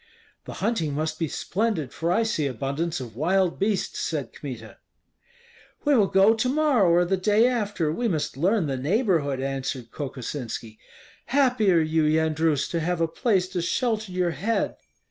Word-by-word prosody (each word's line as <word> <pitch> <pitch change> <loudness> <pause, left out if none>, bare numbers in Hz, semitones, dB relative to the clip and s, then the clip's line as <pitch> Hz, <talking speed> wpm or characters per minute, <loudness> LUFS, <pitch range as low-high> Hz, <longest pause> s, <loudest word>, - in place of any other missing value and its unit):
"The - - -7
hunting 165 -11 0
must 155 +1 -2
be 165 - 0
splendid, 185 - -2
for 170 +1 -1
I 225 +5 +3
see 220 -10 0
abundance 140 +6 -2
of 120 -4 -8
wild 180 +5 +1
beasts," 200 0 -1
said - - -3
Kmita. - - -8 1.1
"We 290 - +4
will 210 -5 +4
go 195 +3 +5
to 230 +3 0
morrow 275 - +3
or 175 +1 +4
the 190 +2 0
day 210 +5 +3
after. 205 -10 -1
We 240 +7 -1
must 155 -6 -2
learn 185 +6 +1
the 135 -3 -2
neighborhood," 155 - +1
answered 135 -3 -4
Kokosinski. 125 -5 -6 0.5
"Happy 250 -7 +3
are 170 - +5
you, 160 0 +1
Yendrus, 155 -1 +1
to 170 - 0
have 175 +2 -1
a 165 - +2
place 190 +1 +1
to 180 - -2
shelter 220 +2 -1
your 180 -1 0
head!" 220 +7 -1
170 Hz, 165 wpm, -25 LUFS, 150-215 Hz, 1.1 s, go